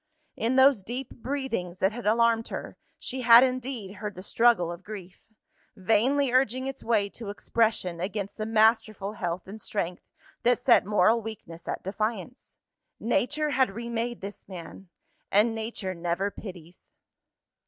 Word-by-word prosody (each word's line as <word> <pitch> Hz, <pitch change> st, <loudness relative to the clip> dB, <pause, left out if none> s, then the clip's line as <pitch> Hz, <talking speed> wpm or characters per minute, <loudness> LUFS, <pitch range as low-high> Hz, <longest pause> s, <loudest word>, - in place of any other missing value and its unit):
In 235 Hz, +3 st, 0 dB
those 265 Hz, -4 st, +6 dB
deep 240 Hz, +6 st, -5 dB
breathings 240 Hz, -9 st, -3 dB
that 190 Hz, +2 st, +2 dB
had 230 Hz, -1 st, -6 dB
alarmed 230 Hz, +1 st, +3 dB
her, -, -, -6 dB, 0.2 s
she 260 Hz, +1 st, -4 dB
had 235 Hz, 0 st, +9 dB
indeed 250 Hz, -6 st, -3 dB
heard 210 Hz, 0 st, -5 dB
the 185 Hz, -, -9 dB
struggle 225 Hz, -6 st, +3 dB
of 175 Hz, +2 st, -9 dB
grief, 190 Hz, -3 st, -10 dB, 0.5 s
vainly 235 Hz, +7 st, +2 dB
urging 255 Hz, 0 st, +2 dB
its 270 Hz, 0 st, -5 dB
way 215 Hz, -3 st, +2 dB
to 220 Hz, 0 st, -8 dB
expression 205 Hz, -4 st, 0 dB
against 200 Hz, +2 st, -3 dB
the 215 Hz, -1 st, -3 dB
masterful 220 Hz, -2 st, +2 dB
health 175 Hz, -3 st, -4 dB
and 215 Hz, +3 st, -8 dB
strength 180 Hz, -4 st, -3 dB, 0.4 s
that 245 Hz, 0 st, +3 dB
set 245 Hz, -4 st, +4 dB
moral 210 Hz, +3 st, +4 dB
weakness 185 Hz, -7 st, -9 dB
at -, -, -3 dB
defiance. 215 Hz, +4 st, -4 dB, 0.4 s
Nature 270 Hz, +6 st, 0 dB
had 260 Hz, -4 st, +3 dB
remade 235 Hz, 0 st, -3 dB
this 200 Hz, +1 st, -9 dB
man 180 Hz, +1 st, -9 dB, 0.4 s
and 215 Hz, +3 st, +4 dB
Nature 220 Hz, -4 st, -4 dB
never 175 Hz, +3 st, -1 dB
pities. 180 Hz, -5 st, -11 dB
220 Hz, 145 wpm, -27 LUFS, 190-240 Hz, 0.5 s, had